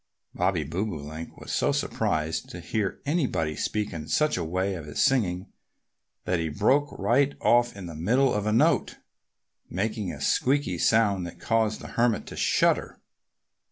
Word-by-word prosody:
Bobby 90 -5 0
Bobolink 80 -2 -5
was - - -8
so - - +2
surprised 80 +1 -1
to - - -8
hear 105 -3 -2
anybody 125 - 0
speak 105 +4 -2
in 80 -2 -6
such 150 - +2
a 90 - -2
way 95 +4 -1
of 85 -5 -7
his 75 - -5
singing 100 -8 +1 0.7
that 90 -1 0
he 80 -1 -1
broke 135 - +2
right 130 +8 +2
off 120 -1 +3
in 95 - -7
the 85 - -7
middle 120 - +2
of 105 0 -1
a - - +2
note, 115 - +2 0.7
making 105 +1 -2
a - - -8
squeaky 130 - +1
sound 100 -5 +2
that 85 - -11
caused 110 -2 0
the - - -8
Hermit 115 -2 +1
to - - -9
shudder. - - +1
100 Hz, 160 wpm, -26 LUFS, 85-120 Hz, 0.7 s, off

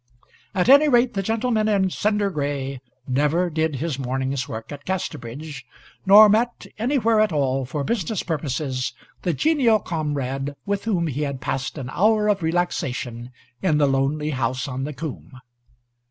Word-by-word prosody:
At 180 +1 +1
any 285 +3 +7
rate, 245 -1 +3
the 195 - -1
gentleman 225 +1 0
in 195 -3 +2
cinder 205 0 0
gray 140 -4 -3 0.3
never 150 +7 +1
did 160 -1 0
his 145 0 -3
morning's 130 0 -2
work 110 +3 -7
at 145 -1 -8
Casterbridge, 150 -6 -5 0.4
nor 210 +2 +10
met 235 +3 +1
anywhere 230 -2 +2
at 215 - +2
all 135 -3 0
for 140 +3 -3
business 210 0 -1
purposes 140 -4 -2 0.3
the 230 - +2
comrade 145 -4 -2
with 200 0 -2
whom 185 -7 +1
he 150 -2 -3
had 140 -3 -2
passed 135 +4 -3
an 130 -2 -5
hour 215 +4 +3
of 200 -2 +1
relaxation 135 -8 -2 0.3
in 160 -5 +2
the 150 - +4
lonely 140 +3 0
house 130 -1 -1
on 135 0 -3
the 150 - -5
coomb. 135 -3 -7
155 Hz, 155 wpm, -23 LUFS, 135-205 Hz, 0.4 s, nor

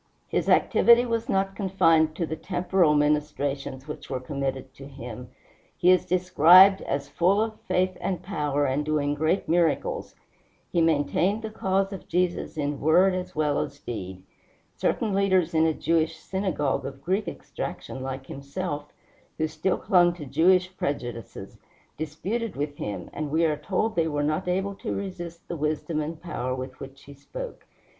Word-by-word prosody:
His - - -1
activity 235 +1 +5
was 230 +1 -2
not 195 -2 0
confined 165 -5 +3
to 170 - -1
the 160 - -4
temporal 175 -2 +1
ministrations 145 -2 -1
which 150 - -8
were 130 - -2
committed 135 -1 -4
to 135 0 -11
him. 125 -3 -9 0.5
He 180 - +5
is 185 - +3
described 185 +2 +6
as 140 0 -3
"full 185 +4 +2
of 220 0 -2
faith 185 0 +1
and 185 -4 -2
power, 150 -6 -1
and 135 +2 0
doing 150 -1 0
great 155 +5 0
miracles." 165 -1 0 0.6
He 170 - +2
maintained 165 +7 +1
the 220 - -4
cause 195 -1 0
of 195 - -9
Jesus 180 -2 -1
in 145 -1 -2
word 180 +5 +4
as 185 0 -4
well 150 -2 +1
as 140 0 -4
deed. 95 -8 -7 0.5
Certain 215 -3 0
leaders 190 -4 +2
in 160 0 +4
a - - +3
Jewish 165 -1 +1
synagogue, 185 -8 -1
of 135 0 -8
Greek 195 +4 0
extraction 130 - -6
like 130 0 -5
himself, 145 +2 -5 0.5
who 160 - 0
still 185 +4 -1
clung 175 -2 +4
to 155 -4 -8
Jewish 185 +6 +3
prejudices, 120 -7 -5 0.4
disputed 190 +10 -3
with 145 +1 -3
him, 100 -4 -5
and 155 -1 -3
we 160 +3 +2
are 155 -2 +2
told 210 +7 -1
they 165 -1 +2
were 145 -2 -1
not 155 +5 -1
able 190 +2 0
to - - -4
resist 175 -3 -6
the 170 - -4
wisdom 155 +1 -1
and 155 +1 -5
power 130 -7 -3
with 130 0 -7
which 135 0 -10
he 140 - -12
spoke. - - -8
160 Hz, 165 wpm, -26 LUFS, 145-185 Hz, 0.6 s, described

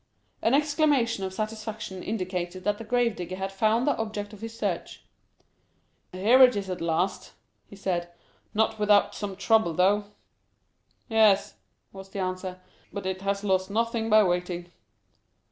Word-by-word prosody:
An 230 +4 +3
exclamation 290 -7 +2
of 190 - -3
satisfaction 215 -1 -5
indicated 185 -3 -4
that 205 +1 0
the - - -6
grave 240 0 +1
digger 180 +1 -5
had 190 +1 -4
found 220 +5 +2
the 290 - +2
object 215 -2 -4
of 210 - -12
his 225 0 -7
search. - - -3 1.1
"Here 215 +8 +4
it 250 -2 +8
is 195 -2 -3
at 180 - -5
last," 170 +3 -1 0.3
he - - -13
said, 175 -3 -2 0.4
"not 220 0 +1
without 210 -1 +4
some 200 -2 -5
trouble, 210 -2 +2
though." 200 +4 +3 1.0
"Yes," 220 -4 +4 0.4
was 195 0 -10
the 195 - -6
answer, 185 0 -3 0.3
"but 200 -2 -6
it 190 0 -3
has 200 +1 -1
lost 190 -1 +1
nothing 225 +1 -1
by 215 0 +7
waiting." 175 -1 -2
200 Hz, 150 wpm, -27 LUFS, 185-225 Hz, 1.1 s, it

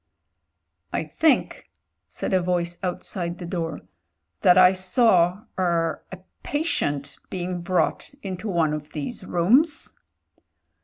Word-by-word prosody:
"I - - -1
think," 270 - +1 0.4
said - - -4
a 185 - +4
voice 175 -1 -1
outside 175 -1 -4
the 175 - -7
door, 165 -3 -4 0.6
"that 180 0 +6
I 185 0 +7
saw— 185 -1 +3 0.2
er 170 -3 0
— - - -41
sl 190 - -7 0.2
patient 145 - -2
being 180 -1 -4
brought 185 +9 0
into 190 +2 -5
one 165 -5 +1
of 150 0 -6
these 160 +9 -5
rooms." 240 - +2
180 Hz, 120 wpm, -24 LUFS, 170-190 Hz, 0.6 s, I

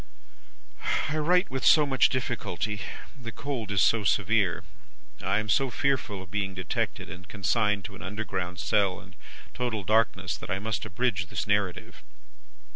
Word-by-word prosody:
"I 155 - -1
write 180 +3 +3
with 130 -1 -2
so 150 -2 +7
much 135 -2 +4
difficulty, 105 -5 -2 0.3
the 120 -5 -7
cold 125 -3 -4
is 100 -1 +3
so 115 -2 +4
severe, 100 -1 +2 0.6
I 100 +1 +1
am 110 0 -1
so 135 +5 +3
fearful 125 -6 0
of 90 - -16
being 100 -2 -1
detected 95 -3 -2
and 90 0 -10
consigned 105 +1 +1
to 100 - -7
an - - -11
underground 95 -2 -3
cell 100 -4 +2
and 90 -2 -15 0.4
total 120 -5 -2
darkness, 100 -2 +2
that - - -8
I 95 - 0
must 110 +1 -2
abridge 100 -3 0
this - - -3
narrative. 100 -3 -1
105 Hz, 155 wpm, -28 LUFS, 95-120 Hz, 0.6 s, so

